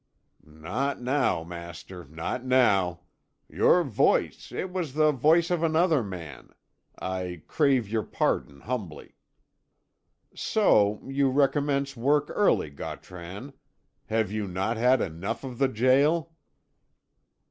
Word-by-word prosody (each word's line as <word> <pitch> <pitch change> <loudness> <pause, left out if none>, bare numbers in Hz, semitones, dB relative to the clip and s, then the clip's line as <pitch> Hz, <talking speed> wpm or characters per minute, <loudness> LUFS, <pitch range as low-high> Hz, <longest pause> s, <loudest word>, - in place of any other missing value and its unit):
"Not 90 - -4
now, 125 - 0
master, 85 +1 -9
not 80 - -5
now. 100 -9 +2 0.5
Your - - +3
voice - - 0
it 185 - -4
was 170 -7 -4
the 155 0 +4
voice 160 +6 +3
of 175 -2 +1
another 165 -2 +3
man. 85 - -8 0.5
I 90 -3 -4
crave 135 -8 +2
your 110 +1 -1
pardon, 70 -8 -2
humbly." 105 -10 -6 1.2
"So 105 - +2
you 135 0 +1
recommence 140 0 +1
work 145 +5 +1
early, 200 - +2
Gautran. 90 - -8 0.5
Have 110 -2 0
you 105 -1 -3
not 95 +5 -2
had 125 +3 +3
enough 95 - -4
of 125 -3 -7
the 135 - +4
gaol?" 140 +7 +2
125 Hz, 115 wpm, -27 LUFS, 90-140 Hz, 1.2 s, the